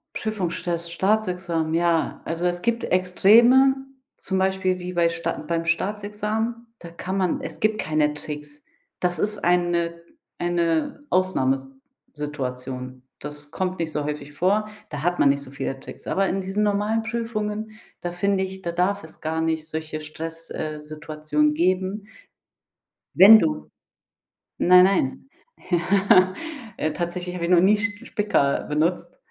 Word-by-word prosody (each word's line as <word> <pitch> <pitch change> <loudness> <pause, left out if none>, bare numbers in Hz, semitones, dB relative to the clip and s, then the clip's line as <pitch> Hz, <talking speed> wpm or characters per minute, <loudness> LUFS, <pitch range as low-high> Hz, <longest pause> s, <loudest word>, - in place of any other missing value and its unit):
Prüfungsstress, 175 -5 -3
Staatsexamen, 180 -4 0
ja. 170 -1 +1
Also, 165 +2 -2
es 175 0 0
gibt 235 +2 0
Extreme, 230 +9 +5 0.4
zum 190 - -3
Beispiel 190 -1 +1
wie 180 +1 -5
bei 170 -1 +3
Sta 165 0 -2
beim 165 0 -1
Staatsexamen, 210 +6 -2
da 170 - -10
kann 185 +3 -4
man 185 -3 0
es - - -7
gibt 215 0 +1
keine 155 -1 +1
Tricks. 150 0 -7 0.4
Das 175 -1 -1
ist 210 0 -1
eine 170 -1 +1 0.4
eine 170 - 0
Ausnahme 185 -8 +2
s 135 0 -13 0.5
Situation. 130 -3 -5 0.2
Das 145 0 -9
kommt 185 -1 -2
nicht 165 -1 -2
so 150 -1 -2
häufig 150 -1 -5
vor. 200 +7 +1 0.2
Da 145 -2 -5
hat 175 +2 0
man 140 - +5
nicht 140 0 +1
so - - -12
viele 135 -1 -4
Tricks. - - -11
Aber 195 0 +1
in 195 - -1
diesen 190 +2 -2
normalen 210 +2 +1
Prüfungen, 220 -2 -3 0.3
da 175 - -3
finde 190 +2 0
ich, 190 0 -6
da 170 - -3
darf 180 +3 0
es 160 - -13
gar 160 +1 -1
nicht 160 -1 -1
solche 155 -1 -5
Stress 165 +2 -8
äh, 155 -1 -4
Situationen 150 0 -1
geben. 185 +4 0 1.1
Wenn 215 +4 +10
du 305 +4 -1 0.9
Nein, 180 0 +7
nein. 190 - 0 0.4
Ja 185 +2 +4 0.4
Äh, 155 - -1
tatsächlich 175 +2 -4
hab 180 - -5
ich 170 - -1
noch 180 -1 +6
nie 205 +3 +5
Sch 215 +2 -3
Spicker 205 - +1
benutzt, 170 +3 -1
175 Hz, 150 wpm, -24 LUFS, 155-200 Hz, 1.1 s, Wenn